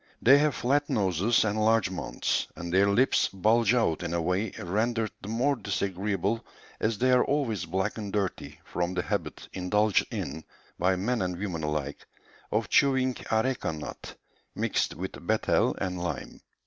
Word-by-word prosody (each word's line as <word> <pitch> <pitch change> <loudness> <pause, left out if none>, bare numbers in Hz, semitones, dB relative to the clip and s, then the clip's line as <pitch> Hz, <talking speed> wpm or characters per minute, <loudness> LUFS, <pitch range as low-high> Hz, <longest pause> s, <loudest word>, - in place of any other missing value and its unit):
They 135 +4 +7
have 150 -2 +2
flat 145 +4 +1
noses 105 - +2
and 105 0 0
large 110 -3 +3
mouths, 95 - -1
and 85 +1 -6
their 95 +2 +5
lips 125 +6 +3
bulge 110 +5 +3
out 90 -10 +1
in 85 -1 -2
a - - +1
way 95 +5 0
rendered 110 +4 -1
the - - -8
more 125 +6 +1
disagreeable 100 0 -1 0.4
as 110 -1 0
they 130 +3 +2
are 125 0 +5
always 120 - -1
black 95 +5 -1
and 100 -2 -5
dirty 100 -3 -3
from 90 +1 -2
the 90 - 0
habit - - -3
indulged 100 +3 +2
in, 80 +4 -5 0.4
by 95 +2 +3
men 115 +6 -1
and 90 -1 -2
women 90 -4 -3
alike, 75 -2 -3 0.4
of - - 0
chewing 130 -2 +3
areca 115 -2 0
nut 75 -2 -8 0.4
mixed - - 0
with - - -7
betel - - +2
and 90 -2 -3
lime. 90 -2 -5
100 Hz, 160 wpm, -28 LUFS, 90-115 Hz, 0.4 s, They